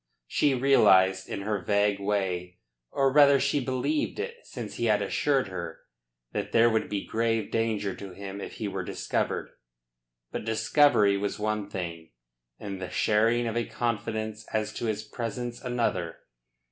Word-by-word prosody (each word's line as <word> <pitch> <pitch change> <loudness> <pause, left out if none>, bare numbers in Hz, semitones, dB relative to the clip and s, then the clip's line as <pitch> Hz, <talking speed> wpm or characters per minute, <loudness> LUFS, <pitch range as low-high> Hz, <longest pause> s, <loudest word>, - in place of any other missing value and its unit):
She 140 - +2
realised 95 -8 +4
in 100 - -4
her 105 0 -1
vague 100 +2 +1
way 95 -3 -2 0.3
or 135 -1 +1
rather 140 -1 +7
she 140 +1 +1
believed 135 - -1
it 470 +3 -4
since - - -8
he - - -1
had - - +3
assured 135 -8 +1
her 85 -3 -6 0.5
that - - -4
there 115 0 +5
would 110 0 0
be 100 -1 -3
grave 115 -1 0
danger 110 -3 0
to 100 -2 -8
him 100 +1 -7
if - - -7
he 110 - -4
were 95 -1 -3
discovered. - - -2 0.8
But - - -4
discovery 110 -2 +4
was 100 0 -2
one 105 -1 -2
thing, 85 -7 -6 0.4
and 100 -2 -6
the 90 - -4
sharing 115 +5 +2
of 115 -1 -2
a 120 - +1
confidence 110 -1 -3
as 110 -1 -1
to - - -4
his 110 -1 -1
presence 120 +2 -5
another. 115 -9 -1
110 Hz, 160 wpm, -28 LUFS, 100-120 Hz, 0.8 s, rather